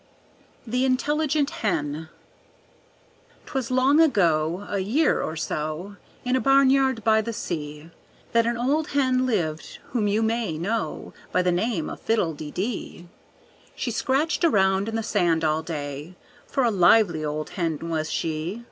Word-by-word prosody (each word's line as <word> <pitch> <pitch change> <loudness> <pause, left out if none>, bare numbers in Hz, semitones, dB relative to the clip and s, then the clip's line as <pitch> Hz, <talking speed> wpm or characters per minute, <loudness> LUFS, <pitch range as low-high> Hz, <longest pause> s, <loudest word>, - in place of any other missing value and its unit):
The 250 +2 0
Intelligent 290 +3 +1
Hen 160 -5 -2 1.4
'Twas 265 -4 -3
long 260 +4 +4
ago, 175 - +2
a 200 - -2
year 240 +12 +2
or 160 - -3
so, 155 +5 -4 0.3
In 250 +1 +1
a - - +2
barnyard 270 -3 +4
by 220 +1 +4
the 230 +2 -4
sea, 155 -7 -5 0.4
That 230 0 +3
an 235 0 0
old 290 +6 0
hen 255 -2 +2
lived 160 -9 -2
whom 225 -4 0
you 210 +2 +1
may 225 -7 -1
know 190 -1 -3 0.2
By 180 - +2
the 180 - +2
name 180 -2 -1
of - - -7
Fiddle 205 -8 +1
de 150 0 -7
dee. 185 -2 -5 0.7
She 240 - -3
scratched 275 +9 0
around 195 - +3
in 225 - -4
the 225 - -1
sand 175 -7 +1
all 155 0 +1
day, 150 +1 -6 0.3
For 270 - 0
a 235 - +3
lively 180 -3 +4
old 150 0 -3
hen 165 -5 -1
was 160 -2 -2
she. 165 +6 -2
205 Hz, 150 wpm, -24 LUFS, 160-250 Hz, 1.4 s, long